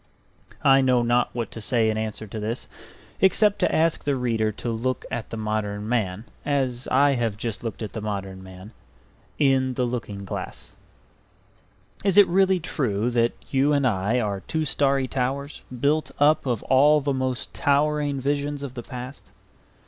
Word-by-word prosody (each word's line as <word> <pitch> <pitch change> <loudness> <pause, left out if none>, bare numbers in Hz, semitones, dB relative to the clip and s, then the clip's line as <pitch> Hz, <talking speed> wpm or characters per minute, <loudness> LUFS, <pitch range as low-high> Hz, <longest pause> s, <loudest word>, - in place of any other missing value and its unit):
I 135 -1 +6
know 125 -2 +3
not 120 +1 +2
what 120 -2 -3
to 115 - -7
say 110 0 +2
in - - -3
answer 110 0 -4
to 110 +1 -7
this, 110 +4 -4 0.5
except 205 +2 +3
to - - +2
ask 165 0 +1
the 140 -1 +1
reader 115 -4 0
to 115 +3 -4
look 125 +3 -2
at 115 - -4
the 115 - -5
modern 105 -1 -2
man, 110 -3 -1 0.2
as 130 -4 -1
I 140 +2 +4
have 115 -5 -1
just 110 -2 -3
looked 115 -1 -4
at 105 - -6
the 110 - -4
modern 95 -3 -4
man 95 +2 -11 0.7
in 130 -3 +2
the 125 - +1
looking 105 -5 -4
glass. - - -6 1.3
Is 195 -1 +2
it 205 -2 +9
really 190 +1 +3
true 120 - -1
that 120 0 +2 0.2
you 140 +2 +3
and 140 -2 +2
I 110 +1 +1
are 100 -4 -1
two 155 +10 -2
starry 135 -2 +1
towers 135 +3 -3 0.2
built 150 +4 +1
up 150 0 +3
of 120 -4 -1
all 145 +3 +5
the 140 -1 -1
most 130 -1 -2
towering 145 -1 +1
visions 145 +1 -1
of 135 -3 -6
the 125 - -6
past? 125 +2 -9
125 Hz, 170 wpm, -24 LUFS, 110-140 Hz, 1.3 s, it